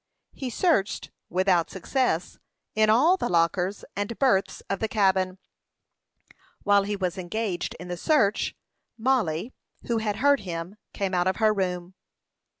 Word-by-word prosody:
He 260 - -5
searched, 225 - +1 0.2
without 180 -1 +2
success, 190 -2 -1 0.3
in 215 0 +3
all 300 - +5
the - - -2
lockers 180 +3 +1
and 205 +3 -3
berths 200 -8 +2
of 195 - -2
the 220 - 0
cabin. 190 -3 +2 1.3
While 200 -1 +4
he 205 0 -2
was 185 -1 -2
engaged 185 0 -3
in 180 - -8
the 175 0 -4
search, 220 - +2 0.4
Mollie, 225 -5 0 0.3
who 235 -1 0
had 210 -2 -1
heard 280 +5 +4
him, 175 +1 -6
came 195 -1 -2
out 180 0 +2
of 185 - +1
her 220 -1 +3
room. 180 -2 -2
200 Hz, 145 wpm, -26 LUFS, 180-225 Hz, 1.3 s, all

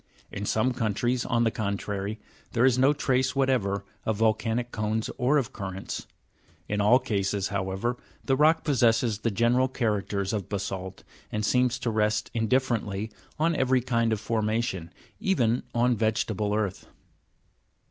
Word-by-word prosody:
In 100 +1 -4
some 125 +4 +1
countries, 120 +1 0
on 120 -1 +2
the 115 - +2
contrary 100 0 -3 0.3
,'there 120 +1 +3
is 130 -1 +4
no 135 +2 +5
trace 130 -3 +1
whatever 120 -8 +1 0.2
of 110 -2 -1
volcanic 115 +2 +1
cones 110 +1 -1
or 130 +4 +3
of 130 -2 -1
currents. 95 -2 -5 0.6
In 105 0 0
all 105 +5 +6
cases, 100 -5 -1
however, 100 +5 -2 0.3
the 135 - +3
rock 155 +4 +4
possesses 115 -6 +2
the 115 - 0
general 120 +5 +2
characters 105 -5 -1
of 100 -5 -3
basa'it, 95 -2 -4 0.3
and 105 0 -1
seems 125 +1 +2
to 120 -2 -2
rest 105 0 0
indifferently 110 -3 0 0.3
on 165 +2 +2
every 130 -2 +2
kind 115 -2 +1
of 110 - 0
formation, 110 -6 -1 0.3
even 130 - +2
on 120 +1 +3
vegeta 110 -1 0
ble 105 +1 0
earth. 105 -3 -2
115 Hz, 145 wpm, -27 LUFS, 105-125 Hz, 0.6 s, all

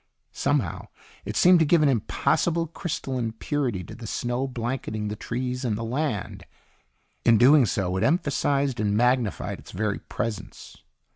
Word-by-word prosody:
Somehow - - -1 0.4
it - - -5
seemed 180 -1 +6
to 160 - +4
give 160 +1 +4
an - - +5
impossible 160 +7 +1
crystalline 130 -8 -3
purity 120 -6 -2
to - - -10
the 115 -2 -9
snow 120 +4 -2
blanketing 120 -4 -3
the 105 - -4
trees 125 +3 -4
and 110 -4 -1
the 115 - -4
land. 120 -2 -3 0.8
In 115 -1 +5
doing 130 +2 +6
so, 95 -1 -1
it 95 - 0
emphasized 140 -5 +1
and 105 -1 +1
magnified 120 -2 +1
its - - -14
very 105 +1 -2
presence. 105 -3 -6
125 Hz, 150 wpm, -25 LUFS, 110-140 Hz, 0.8 s, seemed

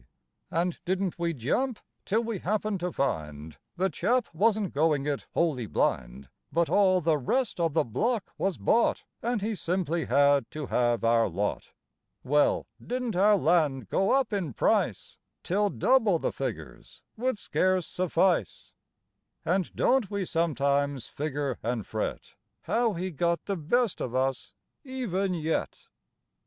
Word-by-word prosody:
And 175 +1 -1
didn't 185 -1 -1
we 170 0 0
jump 220 - -1 0.3
till 220 +4 +1
we 225 -4 -3
happened 210 +1 -1
to 180 +1 -2
find 75 - -3 0.2
The 190 +1 0
chap 235 - 0
wasn't 210 +2 +1
going 150 -1 +2
it 145 -2 -2
wholly 140 -9 +1
blind, 65 -5 -1 0.2
But 170 0 +1
all 185 -3 +4
the 155 -2 +2
rest 250 - -1
of 165 -3 +1
the - - +3
block 215 - -1
was 195 -2 -1
bought 235 - +2 0.2
And 235 -3 -1
he 220 +1 -1
simply 170 -3 -1
had 140 -1 +3
to 150 -1 -5
have 120 -2 +1
our 115 0 +3
lot. 105 +1 -3 0.5
Well, 145 +3 +2 0.2
didn't 245 -3 -3
our 205 +3 +5
land 150 - +1
go 195 - +1
up 270 -4 +2
in 180 -10 -2
price - - 0 0.2
Till 205 +3 +1
double 225 -6 +3
the - - -2
figures 90 - -6
would 255 0 -1
scarce 185 -3 +1
suffice? 180 - 0 0.7
And 180 +1 0
don't 255 -5 +2
we 200 -2 -2
sometimes 140 -6 0
figure 145 -3 -3
and 115 -3 -2
fret - - -4 0.3
How 230 -2 +1
he 185 +1 -3
got 170 +2 0
the 200 - -1
best 210 +7 0
of 125 0 -3
us, 130 0 -1 0.3
even 200 -9 -2
yet? 160 -1 -3
170 Hz, 145 wpm, -28 LUFS, 140-205 Hz, 0.7 s, our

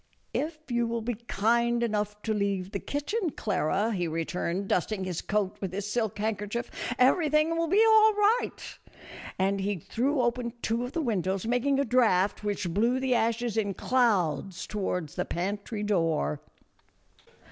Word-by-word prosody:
" - - -41 0.2
If 310 -4 -16
you 240 -1 +1
will 230 -1 -2
be 240 +2 -1
kind 235 +1 +1
enough 210 -2 -1
to 220 - 0
leave 200 -2 -1
the 200 - -3
kitchen, 335 - -2
Clara," 200 +2 0
he 175 -4 -1
returned, 170 +3 -2
dusting 190 +2 0
his 180 -3 -3
coat 205 -2 -1
with 190 -3 -3
his 200 +1 -3
silk 220 -1 -1
handkerchief, 215 +2 -2 0.2
" - - -28
everything 305 +4 +3
will 330 0 0
be 410 +7 +5
all 440 0 +6
right; 420 +4 0 0.2
" - - -16 0.3
and 195 +1 +1
he 200 +1 0
threw 255 - 0
open 240 0 -1
two 230 +2 0
of 245 - -8
the 330 - -1
windows, 195 - -1
making 245 +4 +1
a 280 - +2
draught 215 -6 +2
which 200 -4 -2
blew 235 +6 +2
the 260 -1 +1
ashes 230 -1 0
in 200 -3 0
clouds 195 - +1
toward 180 -6 -2
the - - -3
pantry 205 +4 -3
door. 165 - 0
220 Hz, 170 wpm, -28 LUFS, 195-245 Hz, 0.3 s, all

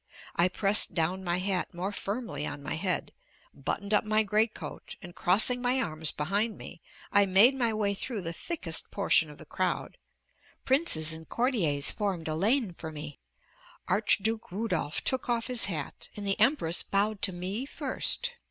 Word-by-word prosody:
I 175 - +4
pressed 195 +2 +4
down 180 +3 0
my 175 -1 0
hat 185 -1 -2
more 185 +3 -3
firmly 200 - -4
on 145 -1 -7
my 150 - -3
head, 180 +3 -2 0.4
buttoned 205 +1 -3
up 210 - +4
my 215 0 +2
great 215 +2 +1
coat, - - -8
and 175 -1 -11
crossing 220 +9 +4
my 250 +1 +1
arms 155 - -1
behind 200 +8 -1
me, 170 - -10 0.3
I 200 -1 +4
made 200 +8 +7
my 240 -4 0
way 210 -2 0
through 210 0 -4
the 165 0 -4
thickest 340 - -2
portion - - +2
of - - -12
the - - -12
crowd. - - -3 0.7
Princes 215 - +1
and 160 0 -10
courtiers 195 - +1
formed 190 -6 -3
a 155 - -1
lane 210 - +1
for 160 -1 -8
me; 150 -1 -8 0.7
Archduke 220 +3 +1
Rudolph 180 -7 -2
took 260 -1 0
off 235 -1 0
his 250 -2 +4
hat, 155 -8 -5
and 205 - -5
the 195 0 +1
Empress 215 - +3
bowed 200 +1 0
to 195 - 0
me 190 +8 -4
first. 485 +10 -2
200 Hz, 170 wpm, -29 LUFS, 175-225 Hz, 0.7 s, made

